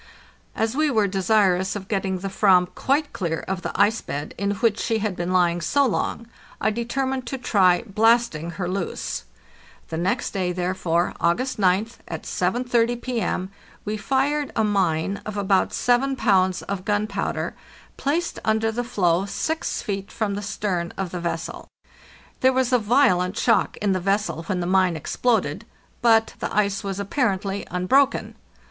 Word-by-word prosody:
As 225 +2 0
we 305 +1 +2
were 220 -6 +2
desirous 190 -1 +2
of 195 -2 -6
getting 195 -2 -1
the 190 +2 -4
"7am 190 -2 +3
quite 290 +2 0
clear 165 -4 -2
of 190 -1 -2
the - - -3
ice 220 +2 +3
bed 145 +2 -5
in 200 0 -1
which 220 0 +1
she 225 -1 0
had 215 -3 -2
been 175 +1 -3
lying 175 -2 +2
so 280 - +2
long, 230 0 -1 0.3
I 215 - +1
determined 255 +3 -2
to 270 - -3
try 190 -7 +3
blasting 220 -6 +2
her 185 -3 -2
loose. 185 - -3 0.6
The 160 - -3
next 190 +8 0
day, 185 -3 -1
therefore, 175 -1 0
August 240 +9 0
oth, 195 +4 +1
at 160 -2 -6
7.30 240 +4 0
P.M., 225 -7 -2 0.3
we 210 +1 -2
fired 270 +7 0
a 220 - +2
mine 195 -2 0
of 210 0 -6
about 195 -1 +2
7 260 +3 +2
pounds 190 -6 +2
of 195 -2 -4
gunpowder, 210 +1 -1 0.4
placed 330 +5 -1
under 220 +1 +1
the 240 +2 -2
floe 185 -5 +1
6 315 +11 -2
feet 200 -3 -4
from 215 -3 -1
the 205 - -3
stern 200 -4 -2
of 190 -3 -3
the 180 - -4
vessel. 170 -1 -4 0.7
There 260 - +4
was 260 -1 +1
a 250 - +5
violent 215 -5 +2
shock 230 - +2
in 205 -1 0
the 185 - +1
vessel 195 -2 0
when 185 -3 -1
the - - -2
mine 185 -1 +3
exploded, 230 - 0 0.4
but 225 -2 +4
the - - -2
ice 200 -1 +1
was 195 -1 -4
apparently 200 -3 -1
unbroken. 260 +10 +2
200 Hz, 165 wpm, -23 LUFS, 185-235 Hz, 0.7 s, a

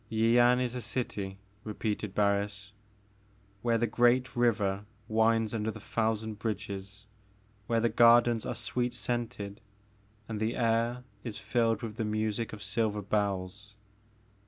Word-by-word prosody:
Yian 120 +2 +4
is 125 -1 -1
a 125 - -3
dty, 105 -5 -3 0.3
repeated 105 -2 -3
Barris, 100 0 0 0.9
"where 115 0 +2
the 120 - +1
great 120 +3 +2
river 105 -5 +1 0.2
winds 110 0 +2
under 110 -1 -1
the 110 - -6
thousand 110 -1 -1
bridges, 100 -1 -5 0.3
— 105 0 -34
where 115 -1 +2
the 115 - +3
gardens 120 0 +5
are - - -3
sweet 125 -1 -2
scented, 120 -4 -3 0.7
and 110 -2 -4
the 110 +2 0
air 115 +1 +1 0.2
is 110 -3 -5
filled 115 -3 0
with 110 -1 -5
the 115 - -1
music 110 +1 -1
of 105 -1 -8
silver 105 0 0
bells. 100 0 -2
110 Hz, 135 wpm, -30 LUFS, 105-115 Hz, 0.9 s, gardens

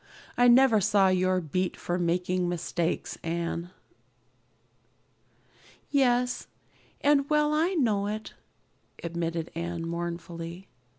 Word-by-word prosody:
"I 245 - +5
never 240 -3 +6
saw 195 0 +4
your 185 0 +2
beat 180 +3 -2
for 175 +1 -2
making 180 +1 0
mistakes, 175 -1 -2
Anne." 170 +1 -3 2.2
"Yes, 250 -3 +2 0.5
and 285 -1 +3
well 300 0 +3
I 335 +5 +1
know 215 - +1
it," 215 +1 -5 0.7
admitted 170 -1 -3
Anne 170 0 -4
mournfully. 170 +1 -5
185 Hz, 100 wpm, -28 LUFS, 170-245 Hz, 2.2 s, never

